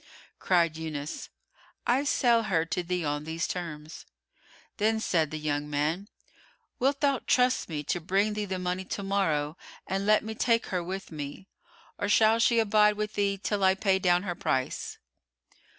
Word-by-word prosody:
Cried 170 -3 +2
Yunus, 155 -2 -5 0.6
"I 255 +4 +2
sell 240 -4 +3
her 165 -6 +1
to 175 +2 -2
thee 180 -1 -2
on 145 0 -1
these 160 +2 -3
terms." 160 -3 -6 0.7
Then 220 +1 +2
said 165 -8 +1
the 155 - -5
young 150 -1 -2
man, 155 +8 -1 0.7
"Wilt 275 +2 +1
thou 280 -3 +2
trust 250 -4 +2
me 150 -2 -3
to 175 +4 -2
bring 195 +5 +1
thee 210 0 -2
the 190 -1 -3
money 180 +1 -2
to 200 +2 -5
morrow 165 -6 0 0.3
and 195 +1 -2
let 215 0 +4
me 220 0 -5
take 230 +1 +2
her 180 -1 0
with 190 +2 -6
me, 145 +3 -7 0.5
or 205 - -1
shall 220 +2 +5
she 235 0 +4
abide 210 -1 +4
with 215 0 -3
thee 200 -1 0
till 200 0 -2
I 190 0 +5
pay 190 -1 +2
down 180 -1 +3
her 180 -3 -2
price?" 130 -6 -2
190 Hz, 170 wpm, -28 LUFS, 160-210 Hz, 0.7 s, shall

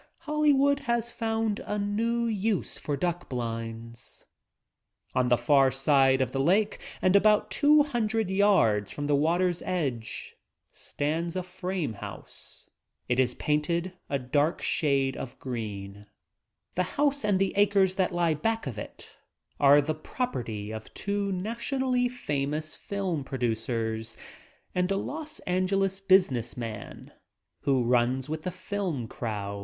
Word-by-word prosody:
Hollywood 290 -3 +3
has 235 0 +1
found 225 -2 -1
a 210 - -3
new 225 +4 0
use 215 -3 0
for 145 -2 -3
duck 175 +3 -2
blinds 115 -1 -6 0.5
— - - -43
On 125 -1 +2
the 120 - +5
far 135 -1 +4
side 135 0 +4
of 130 -2 0
the 135 - -2
lake 200 +9 +2 0.2
and 185 +1 +4
about 210 +1 +4
two: 295 0 +5
■.. - - -6
■ 225 -5 0
red 220 -4 +1
yards 180 - +3
from 145 - -4
the 145 0 +3
water's 175 +4 +2
edge 130 - -3 0.3
stands 165 +4 -3
a 185 - -1
frame 180 - -3
house. 100 - -9 0.4
It 125 +1 +1
is 125 -1 +2
painted 170 +4 0 0.2
3^ 130 -3 -3
dark 150 +3 +2
shade 135 -3 +1
of 130 0 -7
green. 105 -5 -6 0.7
The 180 - +1 0.2
house 285 -1 +2
and 205 -2 +3
the 195 0 +1
acres 200 -2 +4
that 185 -1 +2
lie 175 -2 +2
back 225 +9 -1
of 120 -7 -5
it - - -10 0.4
are 145 +1 +7
the 155 +2 -1
property 120 - -4
of 110 0 -7
two 200 0 -1
nationally 245 +6 0
famous 150 - -2
film 190 -7 -3
produc 120 -4 -2
ers 110 -1 -2 0.6
and 180 0 +1
a 195 - +2
Los 305 +7 -4
Angeles 190 +1 0
business 180 - +3
man 115 -3 -7 0.5
who 135 -3 +2
runs 125 +2 +2
with 155 +1 -4
the 180 - -3
film 180 - -3
crowd. 100 -4 -4
165 Hz, 145 wpm, -28 LUFS, 125-205 Hz, 0.7 s, are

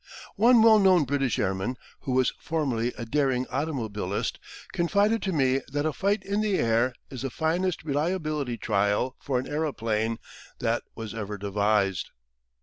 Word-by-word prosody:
One 230 +1 +6
well 220 -1 +7
known 185 -4 +5
British 135 -3 0
airman, 95 +5 -1 0.2
who 130 - -3
was 130 0 +2
formerly 130 -7 -1
a 115 - -5
daring 130 0 +1
automobilist, 110 - -2 0.3
confided 205 +6 +2
to 190 - -1
me 135 -4 +2
that 145 +1 -1
a 155 - 0
fight 200 +6 0
in 200 +2 -1
the 210 -3 +1
air 115 +2 +2 0.2
"is 130 - -6
the 135 - -2
finest 165 +5 -1
reliability 150 -4 -1
trial 105 +6 0
for 135 -3 -1
an 125 - -2
aeroplane 115 -8 -1 0.4
that - - 0
was 110 -1 -6
ever 105 -2 -5
devised!" 100 -1 0
135 Hz, 150 wpm, -27 LUFS, 115-165 Hz, 0.4 s, well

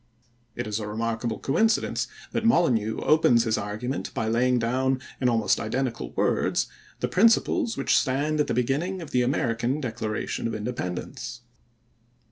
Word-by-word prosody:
It - - -3
is 105 0 -2
a 105 - -4
remarkable 115 +1 -2
coincidence 220 +10 +1 0.2
that - - -1
Molyneux 125 - +2
opens 125 -7 +4
his 110 -2 +1
argument 110 +6 -3
by 110 - -1
laying 125 +3 +2
down 130 +3 +1 0.2
in 125 - +3
almost 115 -3 +2
identical 120 - -2
words - - +1 0.4
the - - +1
principles 225 +3 +3
which - - +2
stand 145 +3 +1
at 150 - +2
the - - -1
beginning 145 +10 0
of 160 - -10
the 125 - +2
American 120 +1 0
Declaration 115 -5 -3
of 115 - -3
Independence. 115 +2 -5
120 Hz, 145 wpm, -26 LUFS, 115-135 Hz, 0.4 s, opens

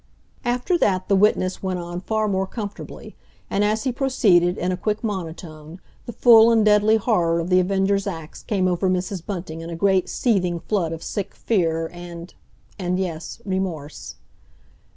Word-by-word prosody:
After 250 +9 0
that, 185 - +1
the 200 - +4
witness 190 -2 +2
went 185 -1 -2
on 175 0 -5
far 215 +2 -1
more 190 -1 0
comfortably; 205 0 -8 0.4
and 200 - +1
as 215 +1 +1
he 260 - 0
proceeded, 205 -10 +2
in 180 +1 -1
a - - 0
quick 210 +4 -2
monotone, 165 -5 -6 0.3
the - - -4
full 230 0 +7
and 225 -2 +3
deadly 210 +1 +5
horror 175 -7 +1
of 170 +2 -3
The 185 - +6
Avenger's 195 +2 +1
acts 165 -5 -7
came 195 -5 0
over 185 +1 +1
Mrs. 185 -1 -2
Bunting 170 -4 -6
in 165 - -7
a 170 - -5
great 190 +1 +2
seething 180 -8 0
flood 175 -4 -1
of 165 0 -6
sick 200 - -4
fear 165 -6 0
and—and, 175 +1 -7
yes, 170 -4 -5
remorse. 185 -6 -4
190 Hz, 165 wpm, -22 LUFS, 175-210 Hz, 0.4 s, full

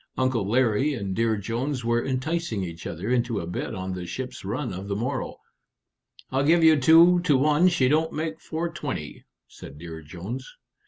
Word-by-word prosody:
Uncle 130 -6 +1
Larry 130 +4 +2
and 100 -5 -3
Dear 115 -1 +1
Jones 120 +5 -3
were 120 0 +1
enticing 135 - -2
each 85 -2 -6
other 85 +7 -5
into 120 -3 +1
a - - -4
bet 90 +1 -4
on 95 0 -4
the 90 -1 -6
ship's 130 +3 -6
run 115 +3 -3
of 95 +2 -6
the 100 - -2
morrow. 125 +5 -3 0.9
"I'll 135 +1 +1
give 165 +3 +4
you 160 -2 +6
two 165 +6 +7
to 155 -6 +3
one 150 +5 +4
she 165 -8 +3
don't 155 +4 +2
make 160 +1 -4
420," 160 - -5 0.2
said 70 - -12
Dear 80 0 -8
Jones. 95 - -7
125 Hz, 175 wpm, -25 LUFS, 100-150 Hz, 0.9 s, two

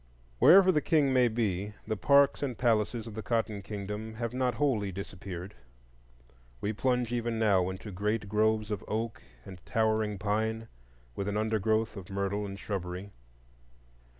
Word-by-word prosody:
Wherever 190 +1 +8
the 150 -4 +2
King 145 -4 +2
may 125 -1 +5
be, 105 -3 -2
the 110 - -1
parks 140 +5 +4
and 130 -5 -2
palaces 115 -1 +1
of 115 - -8
the 110 - -5
Cotton 110 -3 -1
Kingdom 105 +2 -6
have 115 +1 -3
not 130 -1 0
wholly 115 -9 +1
disappeared. 95 0 -7 1.1
We 105 - -2
plunge 125 +1 0
even 120 -1 -1
now 100 -5 +3
into 95 +3 -7
great 105 +2 -1
groves 110 +1 +1
of 105 - -3
oak 110 +1 -3 0.2
and 95 -3 -11
towering 110 -2 0
pine, 110 +3 -1 0.5
with 100 - -3
an 105 0 -1
undergrowth 110 0 0
of 95 -1 -9
myrtle 100 +1 -2
and 100 0 -7
shrubbery. 95 -1 -5
110 Hz, 150 wpm, -30 LUFS, 100-115 Hz, 1.1 s, Wherever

